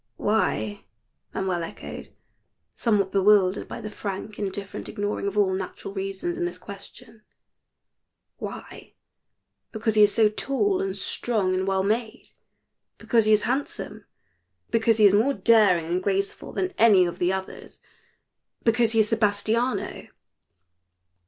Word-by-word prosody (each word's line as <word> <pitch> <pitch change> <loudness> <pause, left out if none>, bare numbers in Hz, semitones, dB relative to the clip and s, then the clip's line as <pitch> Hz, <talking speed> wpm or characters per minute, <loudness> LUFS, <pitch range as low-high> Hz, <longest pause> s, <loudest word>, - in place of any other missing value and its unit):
"' 115 - -52
Why?'" 110 - -1 0.5
Manuel 185 -2 -2
echoed, 165 - -8 0.6
somewhat 205 -5 +1
bewildered 195 -1 +3
by - - -7
the 215 - -6
frank, 205 +1 -6
indifferent 200 -1 -5
ignoring 205 0 -3
of 200 +1 -4
all 195 -2 +3
natural 190 +1 -5
reasons 195 -3 -4
in - - 0
this 175 +1 -4
question 215 +4 -12 1.2
"'why?' - - -9 0.8
Because 220 0 -1
he 215 - +4
is 210 0 +6
so 220 0 +4
tall 275 - 0
and 195 0 -3
strong 195 -2 0
and 185 +1 -1
well 190 -1 +1
made, 220 +2 -2 0.7
because 230 -3 +2
he 215 - +3
is 215 -1 +4
handsome, 265 +4 -3 0.7
because 225 -1 +3
he 215 - +5
is 200 - +6
more 240 +7 +3
daring 205 -8 +4
and 175 +3 -1
graceful 195 0 -2
than 370 0 -2
any 205 -5 +6
of 175 - -5
the 175 +1 +2
others 190 0 -6 0.8
because 230 0 +2
he 225 - +5
is 215 - 0
Sebastiano." 225 +3 0
205 Hz, 140 wpm, -25 LUFS, 190-225 Hz, 1.2 s, is